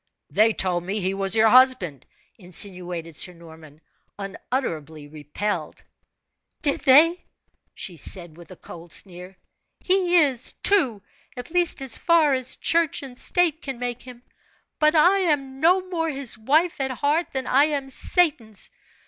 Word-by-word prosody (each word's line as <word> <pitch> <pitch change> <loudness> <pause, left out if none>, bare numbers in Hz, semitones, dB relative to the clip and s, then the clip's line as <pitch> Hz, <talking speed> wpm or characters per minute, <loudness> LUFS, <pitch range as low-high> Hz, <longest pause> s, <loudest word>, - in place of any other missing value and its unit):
"They 220 +2 +3
told 180 -4 -1
me 195 +4 -3
he 190 0 -2
was 195 0 0
your 220 0 +4
husband," 245 - +3 0.3
insinuated 180 -3 -2
Sir 180 - +2
Norman, 160 -3 -16 0.4
unutterably 165 - -5
repelled. 155 +8 -5 0.8
"Did 285 - +1
they?" 310 +6 +5 0.5
she 175 -3 -7
said, 170 +1 -1
with 170 -1 -15
a 185 - -11
cold 170 -1 -12
sneer, 180 0 -5 0.4
"he 365 -2 +1
is, 265 -4 -1
too 260 - +2 0.3
at 245 +5 -9
least 350 -5 0
as 265 - -3
far 330 -4 +3
as 255 -1 -1
church 335 -3 0
and 260 -2 -10
state 335 +3 0
can 270 -3 -6
make 245 0 -5
him; 245 -1 -13 0.6
but 305 +1 +3
I 360 +6 +4
am 275 -7 -1
no 365 +4 +2
more 330 -3 -2
his 275 -4 +2
wife 295 +8 0
at 265 - -1
heart 290 +6 -1
than 265 -1 -3
I 275 +4 +3
am 280 -3 -4
Satan's. 265 - -1
250 Hz, 150 wpm, -23 LUFS, 185-305 Hz, 0.8 s, they